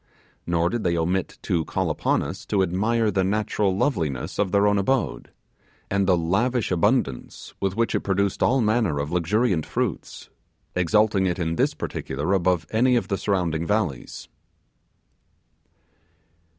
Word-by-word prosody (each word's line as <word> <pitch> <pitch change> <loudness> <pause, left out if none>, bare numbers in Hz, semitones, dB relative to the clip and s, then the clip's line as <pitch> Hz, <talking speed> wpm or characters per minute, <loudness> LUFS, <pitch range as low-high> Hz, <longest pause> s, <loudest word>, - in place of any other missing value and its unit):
Nor 85 0 +1
did 120 - -2
they 85 -1 +1
omit 90 +3 -1
to 85 -2 0
call 95 0 -1
upon 75 - 0
us - - -6
to 95 -2 +2
admire 105 +5 +1
the 95 -1 +1
natural 100 -1 0
loveliness 80 - -1
of 100 -3 +1
their 100 +1 +3
own 105 -1 +3
abode, 130 +6 -1 0.6
and 100 -1 +1
the 90 -2 +4
lavish 105 +9 0
abundance 90 - -1
with 95 -1 -1
which 115 +1 0
it - - +2
produced 100 0 -1
all 130 0 +3
manner 110 -8 +1
of 70 +2 -3
luxuriant 90 +1 +1
fruits; - - -4 0.5
exalting 100 +2 +2
it 90 - -1
in 85 -2 -1
this - - +1
particular 80 +7 -3
above 90 -3 +1
any 125 +3 +3
of 120 - -1
the 100 - 0
surrounding 85 -5 -1
valleys. 105 - -2
95 Hz, 150 wpm, -24 LUFS, 85-110 Hz, 0.6 s, the